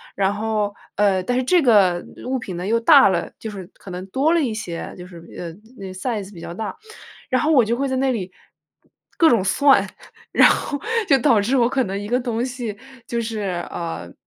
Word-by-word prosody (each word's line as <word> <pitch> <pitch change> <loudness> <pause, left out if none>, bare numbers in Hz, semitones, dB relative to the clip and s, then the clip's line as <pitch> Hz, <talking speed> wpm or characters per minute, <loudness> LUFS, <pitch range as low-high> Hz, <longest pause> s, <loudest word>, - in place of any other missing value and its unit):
然 195 0 +1
后， 210 -1 -1 0.2
呃， 195 -2 +2
但 245 +6 -1
是 - - +2
这 350 +7 +3
个 200 - +4 0.2
物 260 +1 -1
品 190 -7 -6
呢 180 - -4
又 230 +2 +2
大 285 +3 +7
了。 175 -3 -1
就 220 - -6
是 195 -3 -8
可 195 - -13
能 180 +1 -6
多 275 - +1
了 340 - +3
一 250 -6 -1
些， 180 -6 -6
就 180 0 -9
是， 180 -2 -12 0.2
呃， 170 -2 -6 0.2
那 195 - -7
size 205 0 -4
比 170 - -11
较 170 - -7
大。 215 +4 -5 0.5
然 255 - +1
后 310 - +1
我 260 -6 +5
就 225 +2 0
会 275 +2 -1
在 260 - -1
那 265 0 +1
里 190 -6 -4 0.9
各 330 - +5
种 225 -5 +3
算， 275 +8 +4 0.5
然 - - +7
后 285 - -1 0.3
就 275 - +6
导 235 -3 +4
致 240 +7 +1
我 240 -2 +3
可 260 0 0
能 195 -1 -4
一 205 +1 -6
个 245 +2 +2
东 240 -1 -2
西 245 -5 -5 0.3
就 235 0 -2
是， 225 -1 -4 0.3
呃 165 - -6
220 Hz, 245 characters per minute, -21 LUFS, 190-255 Hz, 0.9 s, 大